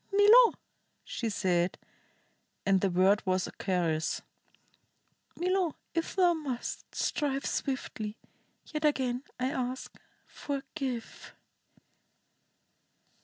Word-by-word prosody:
"Milo," 425 Hz, +4 st, +7 dB, 0.5 s
she 230 Hz, -, -3 dB
said, 180 Hz, -4 st, +1 dB, 0.9 s
and 195 Hz, -1 st, +4 dB
the 195 Hz, -, +2 dB
word 190 Hz, +3 st, +4 dB
was 185 Hz, -1 st, +1 dB
a -, -, -7 dB
caress, 170 Hz, -5 st, -1 dB, 1.1 s
"Milo, 365 Hz, -2 st, +1 dB, 0.2 s
if 330 Hz, -1 st, -2 dB
thou 360 Hz, -2 st, +5 dB
must, 280 Hz, -7 st, -5 dB
strike 275 Hz, -2 st, 0 dB
swiftly. 225 Hz, -5 st, -3 dB, 0.5 s
Yet 305 Hz, -1 st, -4 dB
again 260 Hz, -4 st, +1 dB, 0.2 s
I 255 Hz, +1 st, 0 dB
ask, 255 Hz, -3 st, -3 dB, 0.3 s
forgive." 270 Hz, -4 st, -5 dB
260 Hz, 90 wpm, -30 LUFS, 195-310 Hz, 1.1 s, Milo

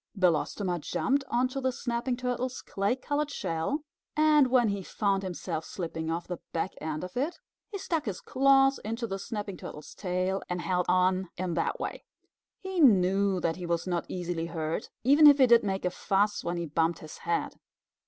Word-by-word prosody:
Belostoma 180 Hz, +1 st, +1 dB
jumped 270 Hz, -, 0 dB
onto 255 Hz, +3 st, 0 dB
the 260 Hz, 0 st, +1 dB
Snapping 245 Hz, -1 st, -2 dB
Turtle's 250 Hz, 0 st, -3 dB
clay 200 Hz, +4 st, 0 dB
colored 290 Hz, +3 st, -2 dB
shell, 275 Hz, -, -2 dB, 0.3 s
and 305 Hz, -3 st, +5 dB
when 245 Hz, -3 st, +3 dB
he 200 Hz, -1 st, -2 dB
found 195 Hz, +1 st, 0 dB
himself 175 Hz, -3 st, -4 dB
slipping 165 Hz, -3 st, -5 dB
off 170 Hz, +1 st, -3 dB
the 180 Hz, -2 st, -5 dB
back 170 Hz, +3 st, -1 dB
end 155 Hz, 0 st, -3 dB
of 180 Hz, -, -7 dB
it, 290 Hz, +8 st, -1 dB, 0.3 s
he 410 Hz, -, -5 dB
stuck 330 Hz, -5 st, -2 dB
his 200 Hz, -5 st, -3 dB
claws 270 Hz, 0 st, +4 dB
into 230 Hz, +2 st, -3 dB
the 195 Hz, -3 st, -4 dB
Snapping 205 Hz, -2 st, -5 dB
Turtle's 150 Hz, -, -9 dB
tail 185 Hz, 0 st, -1 dB
and 180 Hz, 0 st, -2 dB
held 180 Hz, -1 st, 0 dB
on 185 Hz, 0 st, +2 dB
in 180 Hz, -1 st, -2 dB
that 165 Hz, -, -1 dB
way. -, -, -4 dB, 0.6 s
He 380 Hz, -1 st, -3 dB
knew 195 Hz, -, +4 dB
that 165 Hz, 0 st, 0 dB
he 180 Hz, -2 st, -5 dB
was 170 Hz, -1 st, 0 dB
not 175 Hz, -2 st, -1 dB
easily 175 Hz, -2 st, -3 dB
hurt, 160 Hz, +2 st, -3 dB
even 290 Hz, +5 st, +7 dB
if 285 Hz, -1 st, +8 dB
he 265 Hz, -, +7 dB
did 235 Hz, -1 st, +6 dB
make 190 Hz, -2 st, -2 dB
a 180 Hz, -, +1 dB
fuss 200 Hz, +3 st, 0 dB
when 175 Hz, 0 st, -2 dB
he 170 Hz, -, -2 dB
bumped 165 Hz, +2 st, +1 dB
his 155 Hz, -, -11 dB
head. 170 Hz, 0 st, -2 dB
195 Hz, 185 wpm, -29 LUFS, 175-255 Hz, 0.6 s, if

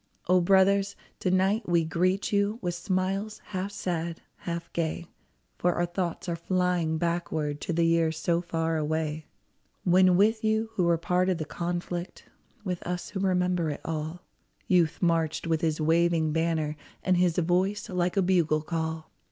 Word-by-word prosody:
O 180 Hz, +1 st, +5 dB
brothers, 195 Hz, +2 st, +3 dB, 0.2 s
to 185 Hz, -, 0 dB
night 190 Hz, +3 st, +1 dB
we 170 Hz, -2 st, +3 dB
greet 185 Hz, +6 st, 0 dB
you 200 Hz, +2 st, +2 dB
With 175 Hz, -4 st, -2 dB
smiles, 190 Hz, +4 st, -2 dB
half 190 Hz, 0 st, -3 dB
sad, 170 Hz, -4 st, -3 dB, 0.2 s
half 170 Hz, -1 st, -5 dB
gay 170 Hz, +1 st, -2 dB, 0.3 s
— -, -, -44 dB
For 175 Hz, 0 st, +2 dB
our 175 Hz, -, +1 dB
thoughts 175 Hz, 0 st, -3 dB
are 170 Hz, -, -1 dB
flying 175 Hz, -2 st, 0 dB
backward 160 Hz, -3 st, -2 dB
To -, -, -3 dB
the 170 Hz, 0 st, +2 dB
years 165 Hz, -1 st, +2 dB
so 170 Hz, +1 st, +1 dB
far 165 Hz, -1 st, -1 dB
away 155 Hz, 0 st, -2 dB, 0.3 s
— -, -, -43 dB, 0.2 s
When 185 Hz, 0 st, +5 dB
with 220 Hz, +3 st, +3 dB
you 220 Hz, +1 st, +1 dB
who 185 Hz, -5 st, +1 dB
were 170 Hz, -1 st, +3 dB
part 180 Hz, +2 st, +1 dB
of 185 Hz, -, +1 dB
the 155 Hz, -, -4 dB
conflict, 175 Hz, +2 st, -4 dB, 0.4 s
With 180 Hz, -4 st, -3 dB
us 180 Hz, 0 st, -4 dB
who 195 Hz, -, -4 dB
remember 180 Hz, -3 st, +1 dB
it 145 Hz, -, -5 dB
all, 160 Hz, +2 st, -4 dB, 0.4 s
Youth 175 Hz, -2 st, +2 dB
marched 165 Hz, -2 st, +1 dB
with 165 Hz, -1 st, 0 dB
his 160 Hz, -2 st, 0 dB
waving 165 Hz, 0 st, +2 dB
banner, 160 Hz, -2 st, 0 dB, 0.3 s
And 185 Hz, -1 st, +3 dB
his 175 Hz, -2 st, +2 dB
voice 180 Hz, +4 st, +1 dB
like 180 Hz, +1 st, -1 dB
a 195 Hz, -, +4 dB
bugle 165 Hz, -4 st, +2 dB
call 160 Hz, -1 st, -3 dB
175 Hz, 170 wpm, -28 LUFS, 165-185 Hz, 0.4 s, O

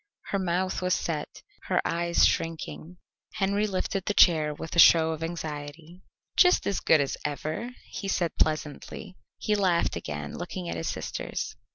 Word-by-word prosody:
Her 200 Hz, -, +1 dB
mouth 185 Hz, +1 st, -1 dB
was 180 Hz, 0 st, +2 dB
set, 155 Hz, -3 st, -4 dB, 0.2 s
her -, -, +1 dB
eyes 170 Hz, 0 st, +2 dB
shrinking. 165 Hz, +1 st, -2 dB, 0.4 s
Henry 200 Hz, +2 st, +1 dB
lifted 190 Hz, -1 st, -2 dB
the 205 Hz, -, -1 dB
chair 155 Hz, -4 st, +5 dB
with 160 Hz, +3 st, -7 dB
a -, -, +3 dB
show 160 Hz, -1 st, +7 dB
of 160 Hz, 0 st, -4 dB
anxiety. 160 Hz, +1 st, -6 dB, 0.3 s
"Just 360 Hz, -1 st, +5 dB
as 200 Hz, -, 0 dB
good 160 Hz, -, +4 dB
as 140 Hz, -1 st, -1 dB
ever," 155 Hz, +10 st, -3 dB, 0.2 s
he 200 Hz, -, -6 dB
said 175 Hz, -4 st, 0 dB
pleasantly. 155 Hz, +5 st, -2 dB, 0.2 s
He 210 Hz, -, -1 dB
laughed 185 Hz, -5 st, +2 dB
again, 75 Hz, -3 st, -5 dB
looking 90 Hz, -, -5 dB
at 85 Hz, -, -3 dB
his 80 Hz, -, -3 dB
sisters. -, -, -4 dB
170 Hz, 160 wpm, -27 LUFS, 155-185 Hz, 0.4 s, show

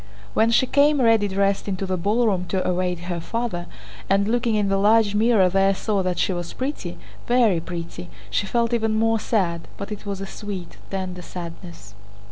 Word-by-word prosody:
When 225 Hz, -, +3 dB
she 235 Hz, +3 st, +4 dB
came 285 Hz, +2 st, +3 dB
ready 225 Hz, -4 st, +4 dB
dressed 195 Hz, +1 st, 0 dB
into 195 Hz, -1 st, -2 dB
the 185 Hz, 0 st, -1 dB
ballroom 200 Hz, 0 st, +1 dB
to 185 Hz, +1 st, -1 dB
await 180 Hz, -1 st, -1 dB
her 175 Hz, -1 st, -3 dB
father, 195 Hz, -2 st, -3 dB, 0.4 s
and 195 Hz, +1 st, +3 dB
looking 235 Hz, 0 st, +1 dB
in 205 Hz, -1 st, +1 dB
the 195 Hz, 0 st, +1 dB
large 210 Hz, 0 st, +4 dB
mirror 215 Hz, -2 st, +4 dB
there 195 Hz, +1 st, +3 dB
saw 205 Hz, 0 st, 0 dB
that 185 Hz, -1 st, -1 dB
she 190 Hz, -, +1 dB
was 175 Hz, -1 st, -5 dB
pretty, 275 Hz, +3 st, -4 dB, 0.3 s
very 235 Hz, -7 st, +4 dB
pretty, 170 Hz, +1 st, -7 dB, 0.2 s
she 205 Hz, -, 0 dB
felt 235 Hz, +2 st, +1 dB
even 220 Hz, -2 st, +1 dB
more 225 Hz, 0 st, +2 dB
sad, 175 Hz, -7 st, -1 dB
but 200 Hz, +2 st, -6 dB
it 210 Hz, 0 st, -7 dB
was 200 Hz, -1 st, -3 dB
a 195 Hz, -, -4 dB
sweet, 195 Hz, -3 st, -7 dB
tender 185 Hz, -2 st, -4 dB
sadness. 170 Hz, -, -9 dB
200 Hz, 185 wpm, -23 LUFS, 180-225 Hz, 0.4 s, she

